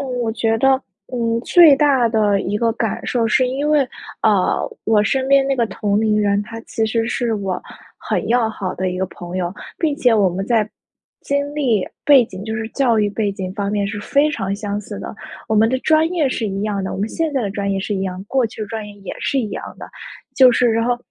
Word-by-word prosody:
嗯， 275 - -4 0.2
我 225 - -1
觉 225 0 0
得， 270 - +3 0.4
嗯， 230 -1 0
最 335 -5 +7
大 270 -5 +3
的 210 -3 +2
一 205 - -2
个 230 +1 +1
感 225 -2 -3
受 235 -2 +1
是 250 +3 +2
因 280 +3 -2
为， 300 -1 +4 0.4
呃， 205 -4 +1
我 215 -2 +3
身 260 +5 0
边 275 0 +5
那 275 -1 0
个 235 - +1
同 205 -1 -1
龄 215 -1 +2
人， 200 0 +2
他 225 +1 -8
其 220 -1 -2
实 225 +1 0
是 235 -2 -1
我 195 -3 -3 0.4
很 - - -2
要 235 -1 +2
好 190 -4 -4
的 185 0 -2
一 180 - -4
个 190 - 0
朋 175 0 -8
友， 175 0 -2 0.3
并 305 -4 0
且 245 -6 +3
我 200 -3 +4
们 190 +3 -4
在 220 -3 +2 0.5
经 285 +1 -1
历、 240 -10 +1 0.2
背 275 -4 +7
景 190 -2 -9
就 220 0 -4
是 220 0 -4
教 240 -5 +2
育 205 -1 +1
背 205 -1 -1
景 185 -1 -5
方 200 -1 -2
面 205 -1 0
是 205 0 -4
非 285 +7 +2
常 195 -7 -2
相 205 0 -4
似 205 0 -8
的， - - -7 0.3
我 220 - +1
们 220 +1 +5
的 260 - 0
专 315 +1 +3
业 315 -6 +1
是 230 -4 -2
一 195 0 -3
样 205 -2 -2
的， 190 - -4
我 - - -5
们 210 +3 -1
现 320 +2 -2
在 265 -3 0
的 200 - -2
专 200 -1 -2
业 195 - 0
是 205 - -3
一 190 - -2
样， 185 0 -4
过 260 -3 +2
去 220 - -11
的 - - -4
专 220 -2 -5
业 205 - -10
也 195 - -7
是 275 - 0
一 215 - -4
样 - - -5
的， - - -9 0.5
就 255 -2 +7
是 245 0 +3
然 230 +1 +1
后， 245 -1 +1
220 Hz, 265 characters per minute, -19 LUFS, 200-250 Hz, 0.5 s, 最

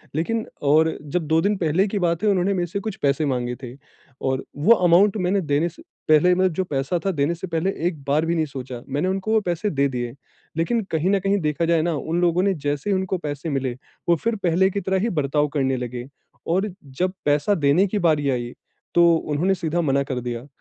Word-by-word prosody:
लेकिन 220 +8 -1 0.2
और 160 +2 +4
जब 150 +2 -3
2 160 +1 +3
दिन 205 +4 +1
पहले 180 +4 +1
की 200 0 -2
बात 170 +1 0
है, 210 - +4
उन्होंने 195 0 +2
मेरे 175 -2 -1
से 200 +4 -3
कुछ 210 0 -5
पैसे 140 +2 +1
माँगे 125 -3 -1
थे। 125 -1 -7 0.5
और 130 0 -1
वो 155 +11 +5
अमाउंट 185 +3 +4
मैंने 190 +1 +1
देने 155 +1 +1
से 170 - -16 0.3
पहले 155 +4 +6
मैं 185 +1 +3
जो 190 - 0
पैसा 145 0 -1
था 195 - +2
देने 150 +1 0
से 175 - -6
पहले 170 +3 0 0.2
एक 155 -6 -5
बार 145 +3 +1
भी 170 +1 0
नहीं 160 -2 +1
सोचा, 130 -3 -7
मैंने 145 +6 0
उनको 190 +3 -1
वो 220 - +4
पैसे 175 +1 -1
दे 140 -5 +1
दिए। 120 -2 -4 0.4
लेकिन 225 +8 +1
कहीं 160 +3 +1
न 200 - +3
कहीं 195 +2 +1
देखा 150 +2 0
जाए 165 -1 +3
ना, 170 0 0
उन 165 +4 -2
लोगों 175 +1 +2
ने 200 - +2
जैसे 145 +3 -3
ही 195 - +3
उनको 190 0 -1
पैसे 150 0 -5
मिले, 135 -3 -1 0.4
वो 170 - +6
फिर 230 +7 -1
पहले 185 -1 +2
की 200 +1 -3
तरह 190 0 0
ही 230 +4 0
बर्ताव 145 +1 +1
करने 135 -3 +1
लगे। 125 0 -5 0.4
और 190 +3 0
जब 175 +8 -2
पैसा 145 +7 +2
देने 150 +5 +3
की 205 +2 -1
बारी 155 -5 +2
आई, 120 -2 -2 0.4
तो 170 -1 +6
उन्होंने 160 +4 0
सीधा 170 0 -1
मना 140 -3 +1
कर 135 -2 -3
दिया। 120 +1 -5
165 Hz, 225 wpm, -23 LUFS, 145-185 Hz, 0.5 s, पहले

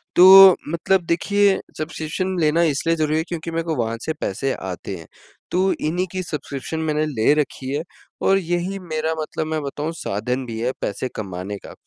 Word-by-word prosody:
तो 190 +1 +10
मतलब 175 +3 +1
देखिए 200 +4 +2 0.2
सब्सक्रिप्शन 160 +4 -3
लेना 160 +1 +3
इसलिए 165 +1 +1
ज़रूरी 155 -1 0
है 160 - +1
क्योंकि 165 -1 -5
मेरे 165 0 -1
को 165 -1 -2
वहाँ 115 -2 -1
से 160 - -1
पैसे 130 +8 -1
आते 95 +1 -6
हैं। 80 -2 -12 0.4
तो 190 +2 +2
इन्हीं 175 +4 -2
की 185 -1 -3
सब्सक्रिप्शन 150 0 -5
मैंने 155 -1 0
ले 140 -1 +2
रखी 135 -3 -2
है, 150 +3 -1 0.4
और 195 - +4
यही 175 +2 -2
मेरा 160 -2 -2
मतलब 155 0 -4
मैं 155 -1 -2
बताऊँ 145 +3 -3
साधन 125 +5 -3
भी 115 -1 -6
है 125 +2 0
पैसे 125 +5 -3
कमाने 95 0 -5
का। - - -10
155 Hz, 180 wpm, -22 LUFS, 130-175 Hz, 0.4 s, तो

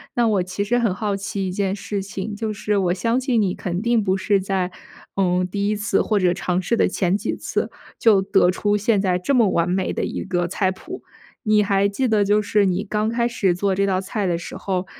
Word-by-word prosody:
那 240 -1 +3
我 200 -4 +2
其 185 +2 -3
实 240 +4 +1
很 230 -6 +1
好 205 0 -1
奇 195 0 -3
一 - - -3
件 195 0 -1
事 205 -1 -4
情， 195 +2 -5
就 220 +1 -3
是 210 0 -1
我 180 -3 +2
相 230 +7 0
信 250 -3 +1
你 190 -3 +1
肯 175 0 -3
定 235 -1 +2
不 190 -1 +1
是 195 +1 +2
在， 190 -1 -1 0.4
嗯， 180 -1 +1
第 200 +2 -1
一 210 - +1
次 205 -1 +1
或 215 - 0
者 180 -2 +3
尝 180 -1 -1
试 210 +6 0
的 - - +3
前 185 -1 0
几 - - -3
次， - - -2 0.3
就 220 -5 +5
得 190 -2 +3
出 205 +3 0
现 210 0 +2
在 185 -2 +1
这 275 +10 0
么 230 -5 +4
完 170 -1 +1
美 185 +1 0
的 - - -2
一 - - -4
个 175 -2 -1
菜 190 +1 0
谱。 365 - -9 0.4
你 215 -2 +3
还 200 0 +2
记 255 +6 -1
得 215 -3 +3
就 205 +1 +3
是 210 0 +2
你 185 +1 0
刚 215 +1 -1
开 235 +1 +1
始 195 -7 +1
做 195 +2 0
这 200 +1 +1
道 190 -1 0
菜 195 +1 -2
的 170 -1 0
时 170 - -8
候， 185 -1 -2
200 Hz, 260 characters per minute, -22 LUFS, 185-210 Hz, 0.4 s, 就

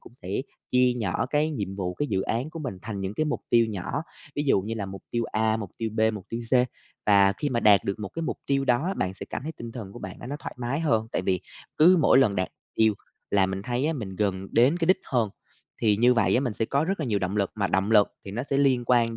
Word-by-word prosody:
cũng 120 - -16
sẽ 95 - -11 0.4
chia 125 0 +4
nhỏ 110 +2 -1
cái 150 +3 +1
nhiệm 100 -9 -4
vụ, 90 -2 -3
cái 145 - -2
dự 95 -2 0
án 120 +9 -2
của 165 - -7
mình 125 -11 -5
thành 110 -3 -5
những 95 +2 -3
cái 155 - 0
mục 150 - -2
tiêu 115 -1 +5
nhỏ, 110 - -3 0.3
ví 145 - +1
dụ 135 -9 +3
như 110 +4 -4
là 100 -3 -3
mục 95 0 -8
tiêu 120 -1 0
A, 110 0 +1
mục 105 -4 -6
tiêu 115 -1 -2
B, - - -1
mục 100 -4 -7
tiêu 115 +1 -4
C. - - +3 0.5
Và 100 -1 +6
khi 145 - 0
mà 120 -3 0
đạt 100 -3 +5
được 100 +2 -2
một 100 -3 -5
cái 165 - -5
mục - - -3
tiêu 135 -1 +1
đó, 145 +10 +1
bạn 95 +1 -1
sẽ - - -8
cảm - - -4
thấy 160 +2 -5
tinh 115 -5 -8
thần 105 -6 -7
của 120 - -9
bạn 95 -4 -7
á, - - -8
nó 145 +3 -4
thoải - - -7
mái 125 +5 -2
hơn. 115 -8 +1
Tại - - 0
vì 90 -1 0 0.4
cứ 180 +4 +7
mỗi 140 - +5
lần 105 -7 +3
đạt 95 - 0 0.3
tiêu 110 -2 +3 0.4
là 95 -2 +4
mình 95 +1 -4
thấy 125 +6 -1
á, 165 - +1
mình 100 - -6
gần 95 -2 -1
đến 130 +8 +4
cái 165 -2 -1
đích 185 - +4
hơn, 115 -6 0 0.5
thì 105 -2 +4
như 125 +3 +5
vậy 115 -4 +3
á, 125 - +4
mình 125 -5 -1
sẽ 115 - -1
có 140 +6 +1
rất 195 +1 -2
là 145 - -1
nhiều 105 -3 +1
động 95 +2 -2
lực, 100 -2 +1
mà 100 -2 0
động 95 +3 0
lực 105 -2 +6 0.2
thì 100 - -7
nó 120 +5 -3
sẽ 140 0 -1
liên 130 -3 +3
quan 115 -2 +3
115 Hz, 285 wpm, -26 LUFS, 100-135 Hz, 0.5 s, cứ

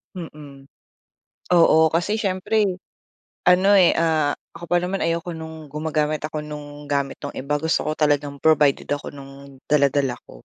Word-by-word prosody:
Mm. 150 -5 -10 0.9
Oo, 160 -1 +6
kasi 175 +7 -1
siyempre 210 +1 0 0.8
ano, 185 +2 +5
eh, 180 -3 +5
ah, 160 -3 +2 0.2
ako 170 - -9
pa 175 - +3
naman 185 +2 -2
ayoko 170 +1 -2
no'ng 160 -1 -9
gumagamit 150 0 -1
ako 155 0 -4
nung 150 -1 -9
gamit 140 -1 -1
ng 145 - -5
iba. 140 +3 -2
Gusto 160 +1 0
ko - - +1
talagang 145 -1 +1
provided 150 -3 +3
ako 145 - -5
no'ng 140 -1 -13
dala-dala 140 -3 +2
ko. - - -14
155 Hz, 150 wpm, -22 LUFS, 145-170 Hz, 0.9 s, Oo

